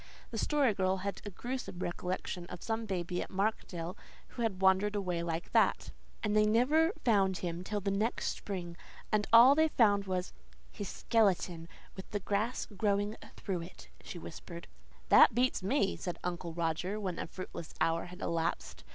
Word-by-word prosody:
The 225 - -3
Story 280 -4 +2
Girl 190 -1 +1
had 200 - -3
a - - -3
gruesome 240 -2 -5
recollection 180 0 -4
of 180 - -8
some 225 0 -2
baby 180 -2 -2
at - - -5
Markdale 190 -3 -2 0.3
who 240 - -7
had 215 -5 -1
wandered 190 +2 +4
away 180 -4 -1
like 170 0 -3
that - - +2 0.3
"And 210 -1 +1
they 210 0 +5
never 290 +10 +4
found 195 -5 +3
him 175 0 -4
till 205 +2 -3
the 200 +1 -1
next 215 +4 0
spring, 175 -4 -5 0.4
and 210 -1 +1
all 235 +4 +9
they 315 +2 +4
found 205 -8 +3
was 185 -1 -2 0.4
HIS 205 - -6
SKELETON, 185 -6 +1 0.3
with 190 - -9
the 205 - -2
grass 210 +5 -1
growing 205 0 0 0.2
through 185 -4 -3
it," 170 +2 -11
she - - -7
whispered. 170 0 -9 0.4
"This - - +9
beats 250 -2 +2
me," 200 +1 +1
said 175 - -4
Uncle 175 -1 -3
Roger, 170 +5 -1
when 185 -4 -3
a - - -3
fruitless 170 -2 -8
hour 165 0 +1
had 180 +1 -11
elapsed. 165 - -2
195 Hz, 170 wpm, -32 LUFS, 175-215 Hz, 0.4 s, all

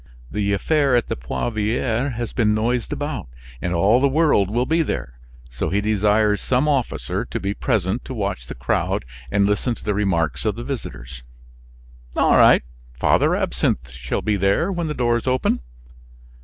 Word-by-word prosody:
The 100 -1 0
affair 140 +6 +2
at 120 - +1
the - - -1
Poivriere 115 - -1
has 120 0 -4
been 105 -3 +2
noised 120 +2 -1
about, 145 - -3 0.3
and 90 - -2
all 100 +8 +4
the 140 - +5
world 145 - +3
will 120 +4 0
be 165 +4 +2
there, - - -4 0.3
so - - -2
he 100 +4 +1
desires 105 0 +2
some 130 +3 +1
officer 135 -5 -1
to - - -4
be 100 +2 -2
present 100 +2 -1
to 130 - -6
watch 100 - -3
the - - -7
crowd 65 0 -1 0.2
and 100 +9 +2
listen 105 +4 0
to - - -14
the 105 - 0
remarks 95 -6 0
of 110 -1 0
the 120 - -6
visitors." 65 - -6 1.0
"All - - +4
right; - - +6 0.3
Father - - +3
Absinthe 60 +1 -1
shall 65 -1 -4
be 105 -2 +1
there 100 - +2
when 175 -3 -2
the 150 - -3
doors 120 0 0
open." 130 0 +1
105 Hz, 170 wpm, -22 LUFS, 95-125 Hz, 1.0 s, right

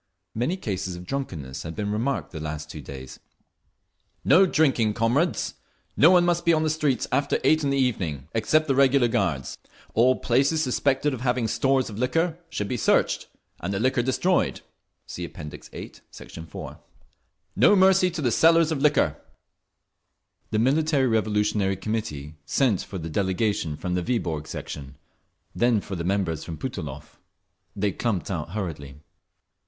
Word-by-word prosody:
Many 125 - -1
cases 95 - -4
of 90 +1 -9
drunkenness 85 - -5
had 80 0 -7
been 105 -1 -2
remarked 120 +6 -2
the 80 - -6
last 75 0 -5
two - - -8
days. 65 -2 -9 1.1
"No 185 +7 +6
drinking, 130 - +2
comrades! 125 +9 +1 0.4
No 155 - +7
one 180 -1 +5
must 175 -1 +1
be 170 - +4
on 155 0 +2
the 155 - +1
streets 150 -5 0
after 140 +2 +1
eight 155 0 +3
in 140 - +1
the 140 - +1
evening, 90 - -1
except 155 +8 +2
the 135 - +2
regular 135 -1 +4
guards. 85 - -1 0.3
All 125 +3 +4
places 140 +7 +1
suspected 135 +2 +1
of 125 - -5
having 125 -2 0
stores 135 +3 +1
of 105 -1 -7
liquor 165 +7 0
should 105 - -3
be 125 - -2
searched, - - +2 0.3
and 90 - -3
the 100 - -1
liquor 130 +1 +2
destroyed. 155 +9 +1 0.4
(See - - -7
App. - - -8
VIII, 75 -1 -8 0.2
Sect. - - -12 0.2
4) 80 - -8 0.8
No 205 - +6
mercy 190 -1 +5
to 165 -3 -5
the 120 - +2
sellers 165 +5 +4
of 145 -4 -1
liquor…." 150 0 +3 1.3
The 110 - -1
Military 140 +4 +2
Revolutionary 105 -3 +1
Committee 95 -8 -4
sent 120 -9 +2
for 100 - -7
the 80 -2 -5
delegation 95 -3 0
from 90 - -3
the 90 - 0
Viborg 85 -8 -2
section; 70 -2 -7 0.6
then 120 -2 +2
for 100 -1 -6
the 85 - -4
members 90 -4 -1
from 80 -2 -7
Putilov. 75 - -7 0.6
They 100 0 0
clumped 100 -3 -2
out 85 -1 -4
hurriedly. 80 -9 -5
115 Hz, 160 wpm, -25 LUFS, 90-140 Hz, 1.3 s, No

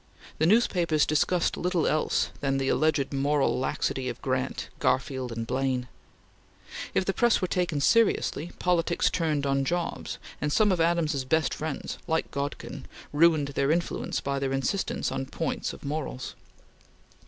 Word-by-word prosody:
The 155 - +4
newspapers 175 -7 +3
discussed 165 +3 +1
little 180 -2 0
else 155 - +1
than 135 -1 0
the 135 0 0
alleged 150 -3 +1
moral 140 0 +1
laxity 130 0 -1
of 120 - -6
Grant, 130 0 -2
Garfield, 130 -1 0
and 115 0 -3
Blaine. 130 0 -1 1.1
If 190 - +2
the 195 - 0
press 240 +1 +3
were 185 - 0
taken 175 -5 0
seriously, 175 -3 +2
politics 175 -1 +1
turned 155 -4 0
on 135 0 +1
jobs, 175 +4 -2 0.2
and 150 - 0
some 210 +5 +4
of 180 -3 +1
Adams's 165 -4 +1
best 155 +3 +1
friends, 155 -2 -4
like 160 0 0
Godkin, 140 +1 -4 0.3
ruined 155 -2 +4
their 140 0 0
influence 170 +2 0
by 140 0 -1
their 135 -1 -1
insistence 135 +9 -1
on 135 - -3
points 160 +2 -2
of - - -11
morals. 140 -3 -4
150 Hz, 150 wpm, -27 LUFS, 135-170 Hz, 1.1 s, The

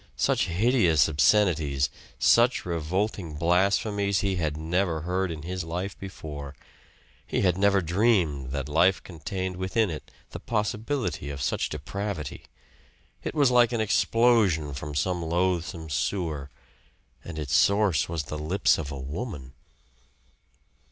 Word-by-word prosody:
Such - - +2
hideous 90 - +3
obscenities, 75 -4 +2 0.3
such 105 - +4
revolting 85 +1 -2
blasphemies 100 +4 +1
he 95 -2 0
had 75 -3 -1
never 85 +1 0
heard 90 +3 -1
in 80 -2 -6
his 90 +2 -4
life 90 +4 -4
before 75 -7 -8 0.7
he - - -1
had 90 -3 +3
never 100 0 +3
dreamed 85 - +1
that 70 0 -3
life 85 +5 +3
contained 90 +2 -5
within 95 +2 0
it 75 - -7 0.2
the - - -7
possibility 110 - -2
of 70 -1 -6
such - - -1
depravity. 80 0 -5 0.8
It - - -4
was 140 -4 +4
like 120 -1 +5
an 115 - 0
explosion 110 -8 +2
from 75 +2 -6
some 90 +4 0
loathsome 85 -1 -1
sewer; 75 -2 -2 0.7
and 85 -2 -8
its 75 -3 -3
source 100 - +3
was 80 -3 -2
the 75 +1 -6
lips 85 +5 +2
of 75 -2 -5
a 70 - -5
woman. 70 - -6
90 Hz, 130 wpm, -26 LUFS, 75-100 Hz, 0.8 s, like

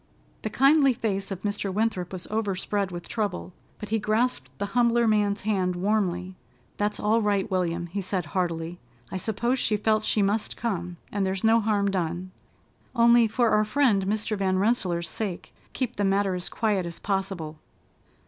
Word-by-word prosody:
The 220 - -3
kindly 275 +3 +5
face 195 -4 -2
of 195 -2 -6
Mr. 205 -1 -2
Winthrop 195 -3 -1
was 185 -2 -6
overspread 200 -2 -1
with 175 -1 -7
trouble, 205 -5 -3 0.2
but 210 - -8
he 225 +1 +1
grasped 215 - 0
the - - -2
humbler 235 -1 +3
man's 205 -1 +2
hand 190 -3 0
warmly: 185 -2 0 0.4
"That's 205 0 -1
all 220 +2 +2
right, 205 -1 0
William," 175 -2 0
he 190 +4 -4
said 185 -2 -2
heartily. 170 -2 -2 0.3
"I 190 - -2
suppose 235 +6 0
she 215 - +2
felt 215 +1 +1
she 210 - +2
must 210 +2 -1
come, 180 -6 -3
and 200 -1 0
there's 190 0 -1
no 225 +1 +5
harm 205 -2 +1
done. 180 0 -2 0.6
Only, 235 -1 +6
for 235 +1 +2
our 215 - +4
friend 215 -5 +2
Mr. 215 +1 -1
Van 190 -2 +1
Rensselaer's 185 -5 +1
sake, 185 +1 -5 0.2
keep 250 -3 -3
the 205 - 0
matter 195 0 +2
as 180 -1 -3
quiet 205 -5 0
as 170 - -7
possible." 190 -6 -3
200 Hz, 170 wpm, -26 LUFS, 185-220 Hz, 0.6 s, Only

